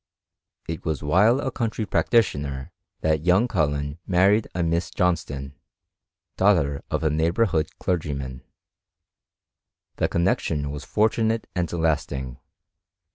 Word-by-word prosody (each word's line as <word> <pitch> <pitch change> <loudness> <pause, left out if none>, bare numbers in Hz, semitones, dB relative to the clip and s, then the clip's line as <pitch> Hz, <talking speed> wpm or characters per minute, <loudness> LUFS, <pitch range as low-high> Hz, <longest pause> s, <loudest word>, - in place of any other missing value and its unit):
It 80 -1 -5
was 80 -4 -2
while 105 - +4
a 135 -2 -2
country 115 -2 -2
pracdtKmer 75 - +1 0.3
that 80 -1 +1
young 90 +7 +4
Col* 90 -10 +2
len 70 +1 -4
married 100 +4 +3
a 90 - 0
Miss 85 +1 0
Johnston, 70 -6 -1 0.9
daoghter 85 -8 +3
of - - -1
a 80 - +2
noghbonr 85 +8 +2 0.2
in^ 75 - -7
clergyman. 70 -7 -3 1.6
The - - +2
connexion 80 -4 0
was 75 -1 -6
fortunate 110 +1 +1
and 90 -2 -1
last 80 -3 0
ing. 65 -3 -5
80 Hz, 125 wpm, -24 LUFS, 70-100 Hz, 1.6 s, while